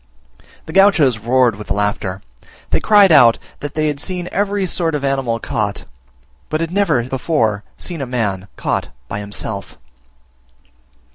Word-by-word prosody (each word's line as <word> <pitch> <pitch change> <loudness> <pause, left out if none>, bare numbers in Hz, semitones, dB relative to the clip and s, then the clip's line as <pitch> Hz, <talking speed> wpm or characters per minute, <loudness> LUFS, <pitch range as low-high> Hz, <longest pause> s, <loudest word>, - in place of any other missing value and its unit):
The 160 - -8
Gauchos 165 - +4
roared 120 0 +2
with 105 - -9
laughter; 100 -2 -2 0.5
they - - +3
cried 205 -4 +5
out 120 -7 +7 0.2
that 145 0 -6
they 155 0 +1
had 145 -2 -1
seen 180 +2 -3
every 200 0 0
sort 165 -3 0
of 140 -1 -2
animal 135 -4 0
caught, 105 -3 -3 0.6
but 155 - -1
had 165 0 -2
never 175 -11 +2
before 120 -5 0
seen 170 -5 -4
a 135 - -3
man 100 -6 -2
caught - - -2 0.2
by 100 - -4
himself. 100 0 -5
135 Hz, 145 wpm, -18 LUFS, 110-165 Hz, 0.6 s, out